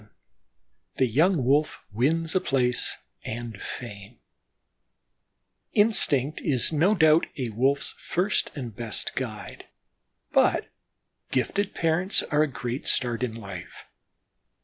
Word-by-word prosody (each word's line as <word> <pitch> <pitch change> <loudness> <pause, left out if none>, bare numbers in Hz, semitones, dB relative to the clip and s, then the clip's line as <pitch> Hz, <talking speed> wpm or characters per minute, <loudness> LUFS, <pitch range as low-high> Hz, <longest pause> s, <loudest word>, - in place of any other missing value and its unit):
VII 105 - -21 0.9
THE 130 - +3
YOUNG 155 - +3
WOLF 145 +4 +2
WINS 160 +9 +1
A 185 - +2
PLACE 125 -2 0 0.3
AND 115 -2 -6
FAME 105 -1 -8 1.6
Instinct 155 - +2
is 140 +1 +1
no 175 +8 +3
doubt 160 -2 +5
a 125 -4 -2
Wolf's 135 +6 +1
first 185 +4 0
and 120 -7 -6
best 115 -1 -4
guide, 110 -5 -6 0.7
but - - +3 0.6
gifted 190 - -1
parents 170 +4 +1
are 150 0 +3
a 155 - +3
great 125 -1 -4
start 120 -2 +1
in 120 -3 -2
life. 95 -5 -9
130 Hz, 115 wpm, -26 LUFS, 115-160 Hz, 1.6 s, doubt